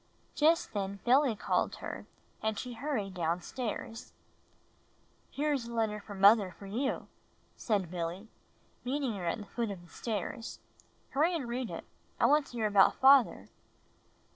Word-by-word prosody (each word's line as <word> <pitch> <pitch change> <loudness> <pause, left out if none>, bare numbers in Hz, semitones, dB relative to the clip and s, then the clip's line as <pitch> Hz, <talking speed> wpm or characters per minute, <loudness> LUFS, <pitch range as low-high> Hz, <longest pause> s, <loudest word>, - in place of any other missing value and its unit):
Just 320 +3 +3
then 200 -1 -3
Billy 255 -1 +4
called - - 0
her - - -7 0.3
and 220 -1 -1
she 250 -1 -5
hurried 230 -7 -3
down 170 0 -1
stairs. 225 -2 -5 1.2
''Here 295 +1 0
is 250 -5 -2
a 235 - -7
letter 220 -2 0
from 205 -1 -9
mother 200 -1 +7
for 200 - -10
you," 240 +8 -2 0.5
said 195 -6 -1
Billy, 175 +4 -4 0.6
meeting 265 -1 -1
her 185 -4 -4
at 170 - 0
the 210 - -8
foot 230 +1 -3
of 190 -3 -7
the 175 - -18
stairs. 225 +1 -4 0.5
"Hurry 320 +6 +2
and 280 -7 -3
read 245 0 -3
it. - - -6 0.3
I - - +4
want 295 -1 +4
to - - -14
hear 230 -2 -1
about 205 -2 +5
father." 265 -2 +5
225 Hz, 160 wpm, -31 LUFS, 200-260 Hz, 1.2 s, mother